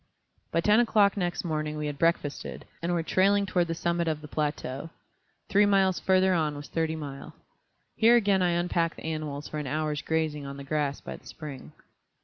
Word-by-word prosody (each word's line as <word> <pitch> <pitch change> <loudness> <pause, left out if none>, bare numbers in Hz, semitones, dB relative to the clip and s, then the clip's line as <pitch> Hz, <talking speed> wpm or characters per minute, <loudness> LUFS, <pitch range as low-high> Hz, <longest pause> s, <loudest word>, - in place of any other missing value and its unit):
By 165 - +2
ten 210 +5 +5
o'clock 210 -4 +4
next 175 -3 -2
morning 155 -2 -2
we 150 - -3
had 145 -1 -4
breakfasted, 165 -4 -1 0.2
and 170 +1 -1
were 170 -2 0
trailing 200 +4 +3
toward 180 -2 +1
the 165 - -2
summit 170 0 0
of 155 -1 -1
the 150 - -9
plateau. 145 -1 -3 0.6
Three 205 0 +4
miles 195 -2 +3
further 190 0 +3
on 155 -4 +1
was 145 0 -8
Thirty 160 -1 -1
Mile. 140 -3 -8 0.6
Here 230 +1 +6
again 200 -5 +3
I 180 - +3
unpacked 170 -1 0
the - - -11
animals 155 -2 -4
for 150 - -4
an 150 - -4
hour's 150 +1 -1
grazing 160 -2 -1
on 140 0 -7
the 140 - -7
grass 140 -1 -1
by - - -7
the - - -18
spring. 145 -4 -9
160 Hz, 195 wpm, -28 LUFS, 150-185 Hz, 0.6 s, Here